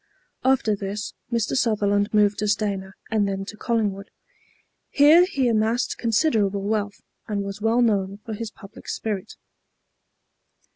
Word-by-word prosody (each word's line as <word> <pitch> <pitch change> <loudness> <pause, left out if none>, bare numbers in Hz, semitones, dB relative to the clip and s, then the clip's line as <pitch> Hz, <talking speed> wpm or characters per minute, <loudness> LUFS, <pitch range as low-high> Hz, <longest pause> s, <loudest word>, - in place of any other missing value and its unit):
After 255 -5 +2
this 200 0 -5 0.2
Mr. 230 -2 0
Sutherland 205 -4 +1
moved 210 -1 +3
to 210 - 0
Stayner 200 -2 -1 0.2
and 210 -2 +2
then 195 0 -3
to 215 - -8
Collingwood. 210 -4 -1 0.8
Here 310 +5 +6
he 270 -8 0
amassed 225 +1 0
considerable 215 -5 +1
wealth, 205 -1 -2 0.3
and 205 -2 -2
was 200 +1 -6
well 230 +3 +3
known 200 -3 +1
for 225 - -5
his 225 +1 -5
public 200 -1 -14
spirit. 210 -2 -4
210 Hz, 135 wpm, -24 LUFS, 200-230 Hz, 0.8 s, Here